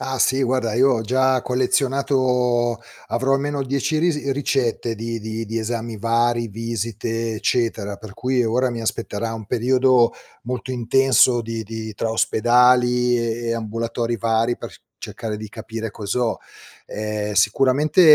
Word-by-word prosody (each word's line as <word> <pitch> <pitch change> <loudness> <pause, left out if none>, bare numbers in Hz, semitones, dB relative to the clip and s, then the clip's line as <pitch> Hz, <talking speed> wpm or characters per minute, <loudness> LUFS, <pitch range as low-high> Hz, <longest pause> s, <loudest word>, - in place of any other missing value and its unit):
Ah, 130 -1 -3
sì, 135 +1 +3
guarda, 125 -3 0
io 130 +3 +4
ho 115 - 0
già 130 +2 +2
collezionato 125 -2 +1 0.3
avrò 135 +3 +1
almeno 140 0 -1
10 140 +4 -1
ris 150 -4 0
ricette 130 -4 0
di 115 +1 -4
di 110 +1 -4
di 115 +1 -3
esami 115 0 -4
vari, 115 +1 +1
visite, 115 +1 -3
eccetera. 110 -3 -1
Per 110 -3 -11
cui 125 +1 0
ora 125 +3 +1
mi 115 -1 -4
aspetterà 115 0 -3
un 110 - -7
periodo 125 0 +3 0.3
molto 125 +1 -4
intenso 125 0 +3
di 115 0 -4
di 110 0 -6
tra 110 +2 -2
ospedali 125 +2 +3
e 115 0 -2
e 115 - +1
ambulatori 115 +1 -2
vari, 115 +2 +1
per - - -8
c - - -17 0.2
cercare 110 -2 -5
di 110 0 -8
capire 110 0 -6
cos'ho. 115 +3 -2 0.5
Ehm, 105 0 -3
sicuramente 135 - +3
120 Hz, 145 wpm, -21 LUFS, 115-130 Hz, 0.5 s, io